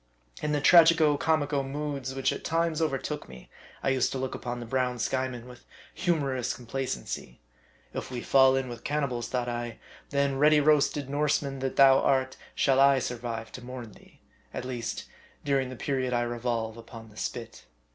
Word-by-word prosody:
In 150 - -1
the 150 - +1
tragico 165 -1 +6
comico 145 -2 +1
moods 135 -1 -4
which 135 - +1
at - - -7
times 165 -1 0
overtook 150 - -2
me, 65 -1 -13 0.3
I - - +2
used 130 -1 +2
to - - -2
look 130 0 -3
upon 120 0 -4
the 120 - -6
brown 125 +1 0
Skyeman 125 0 -2
with 125 -1 -13 0.3
humorous 145 -8 0
complacency. 125 - -5 0.5
If - - -5
we 125 -2 -4
fall 135 -1 +5
in 135 -1 -1
with 120 -1 -8
cannibals, 135 -5 -1
thought 125 -1 -2
I, 120 -1 -4 0.3
then, 140 -1 0
ready 150 +1 +6
roasted 145 -1 +3
Norseman 140 -1 0
that 135 0 -2
thou 135 -1 +7
art, 130 -1 +1 0.2
shall 135 -1 +3
I 140 0 +6
survive 120 -3 -4
to 125 - -9
mourn 125 -3 -8
thee; - - -20 0.3
at - - -4
least, 125 -2 -4 0.4
during 135 -2 +1
the 130 - -7
period 130 0 -1
I 120 0 +2
revolve 120 -2 -2
upon 115 -1 -11
the - - -18
spit. - - -6
130 Hz, 175 wpm, -28 LUFS, 120-140 Hz, 0.5 s, thou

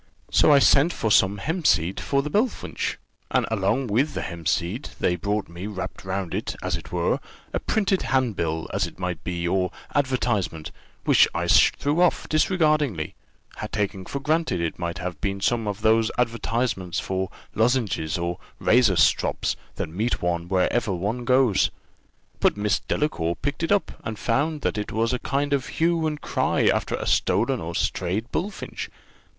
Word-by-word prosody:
So - - +5
I 145 - +8
sent 140 +4 +5
for 110 -9 -1
some 100 0 +4
hempseed 95 - +1
for 140 0 0
the 150 - -4
bullfinch, 220 - -1 0.3
and - - +2
along 110 +5 +1
with 130 +7 +1
the - - -2
hempseed 85 - -2
they 90 - +2
brought 100 +4 -2
me 85 +4 -7
wrapped 95 -3 -6
round 95 -2 -3
it, - - -3
as - - 0
it - - -8
were, - - +1 0.3
a - - 0
printed 195 -3 +1
handbill, 95 - 0
as 95 -2 +1
it - - -13
might 90 -2 -4
be, 85 -1 -2
or 90 +1 +1 0.2
advertisement, 120 - 0 0.3
which - - +6
I - - -1
threw 150 +4 +4
off, 180 - +2
disregardingly, 155 - +1 0.6
taking 100 -3 -2
for 140 - -3
granted 155 - 0
it 85 0 -2
might 85 +1 -3
have 90 -2 -5
been 100 -1 -1
some 115 +2 0
of 105 0 -3
those 110 0 +4
advertisements 115 -5 -1
for 95 -1 -2 0.2
lozenges 110 -10 +1
or 85 0 -3 0.2
razor 115 -5 +4
strops, - - +2 0.2
that - - -3
meet 105 +9 -1
one 85 -1 -1
wherever 95 +4 +1
one 105 +7 -2
goes; 125 -5 +4 0.7
but - - +3
Miss 105 0 +1
Delacour 85 - -1
picked 140 +4 -3
it 165 - -1
up, 205 -1 +2
and 110 -2 -4
found 145 +7 0
it 105 0 -1
was 115 +2 0
a 125 - -1
kind 140 +3 -1
of 135 -2 0
hue 165 -1 +1
and 150 -1 -3
cry - - +1
after - - +2
a - - -4
stolen - - +2
or - - -5
strayed 100 +7 -1
bullfinch. 200 +2 -4
110 Hz, 165 wpm, -24 LUFS, 90-140 Hz, 0.7 s, I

